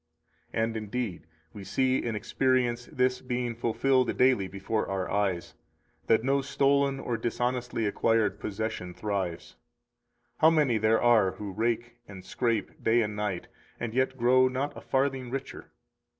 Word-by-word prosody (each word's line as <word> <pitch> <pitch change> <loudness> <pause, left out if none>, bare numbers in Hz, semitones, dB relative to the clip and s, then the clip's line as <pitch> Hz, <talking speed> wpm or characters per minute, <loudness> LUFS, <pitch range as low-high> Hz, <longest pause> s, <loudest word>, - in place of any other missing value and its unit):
243 110 - 0
And 115 0 -2
indeed, 105 -7 -4 0.3
we 100 - -8
see 130 +5 +1
and 115 -3 -2
experience 120 +1 0
this 125 0 +1
being 125 -1 -2
fulfilled 125 +3 +1
daily 125 -7 +3
before 100 +3 -2
our 95 -1 -2
eyes, 95 -4 -1 0.5
that 110 0 +4
no 135 +2 +2
stolen 140 0 +2
or 120 -3 -2
dishonestly 120 0 -1
acquired 105 -1 +1
possession 100 -4 -4
thrives. 95 -5 -3 0.8
How 160 - +7
many 145 -8 +2
there 110 +1 +3
are 110 -6 +4
who 105 -2 -6
rake 120 +3 -2
and 95 -2 -11
scrape 115 -1 -2
day 115 +1 +4
and 105 -1 -4
night, 105 -4 -3 0.3
and 120 -2 -4
yet 130 +1 0
grow 130 +2 +5
not 130 +3 -2
a - - -9
farthing 135 -2 0
richer! 135 +2 -6
120 Hz, 150 wpm, -28 LUFS, 105-130 Hz, 0.8 s, How